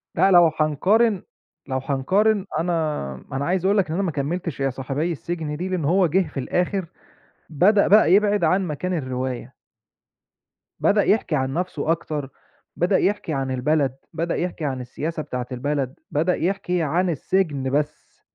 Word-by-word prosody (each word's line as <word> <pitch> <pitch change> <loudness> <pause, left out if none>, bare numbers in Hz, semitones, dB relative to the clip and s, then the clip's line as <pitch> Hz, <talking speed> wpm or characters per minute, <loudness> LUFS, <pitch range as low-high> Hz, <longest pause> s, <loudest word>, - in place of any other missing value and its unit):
لأ 195 - +4
لو 175 -3 +7
هنقارن 190 +8 +2 0.4
لو 130 -1 -1
هنقارن، 190 +10 +1
أنا 160 - -1 0.2
أنا 135 +1 -2
عايز 180 +2 0
أقول 200 +2 +3
لك 195 - +2
إن 155 - -4
أنا 195 +4 0
ما 180 - 0
كمّلتش 155 +2 -3
يا 135 0 +1
صاحبيّ 135 +6 -2
السجن 160 -2 -4
دي، 180 +3 -3
لأن 180 -5 -1
هو 180 +4 +3
جه 180 +2 +1
في 145 - -6
الآخر 180 +7 -1 0.6
بدأ 200 +7 +4
بقى 205 -3 +6
يبعد 205 -1 +3
عن 185 +3 +2
مكان 175 +4 -3
الرواية. 130 -3 -4 1.2
بدأ 205 0 +3
يحكِي 205 -6 +1
عن 135 -1 -1
نفسه 165 -3 -1
أكتر، 150 -4 -3 0.5
بدأ 180 +3 +2
يحكِي 200 -5 0
عن 135 -2 -2
البلد، 135 +1 +1 0.2
بدأ 165 +1 -1
يحكِي 175 -3 -3
عن 130 -3 -2
السياسة 155 +6 -4
بتاعة 125 -3 -4
البلد، 135 +1 -2
بدأ 165 +5 +1
يحكِ 180 +1 -2
عن 175 +1 +1
السجن 155 -4 0
بس، 145 +1 -3
165 Hz, 160 wpm, -23 LUFS, 140-185 Hz, 1.2 s, لو